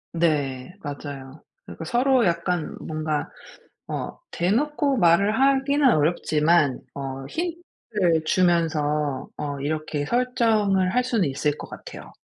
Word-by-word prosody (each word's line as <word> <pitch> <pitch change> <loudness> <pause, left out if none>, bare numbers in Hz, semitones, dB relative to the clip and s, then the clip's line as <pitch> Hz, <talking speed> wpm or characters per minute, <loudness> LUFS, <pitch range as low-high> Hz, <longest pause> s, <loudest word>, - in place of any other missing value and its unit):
네 145 -2 0
맞아요. 140 -1 -7 0.2
그러니까 165 - -8
서로 250 +4 +3
약간 170 -1 -1
뭔가 155 -1 -3 0.6
어 - - -4
대놓고 275 +9 +1
말을 200 +5 +4
하기는 275 +1 +3
어렵지만 155 -2 +2 0.2
어 135 -1 -5
힌트를 225 - -2
주면서 155 -6 +1
어 145 -1 -4
이렇게 150 0 -2
설정을 225 -6 +2
할 250 - +3
수는 225 - +1
있을 145 +2 -1
것 - - -9
같아요. - - -10
170 Hz, 245 characters per minute, -24 LUFS, 150-230 Hz, 0.6 s, 말을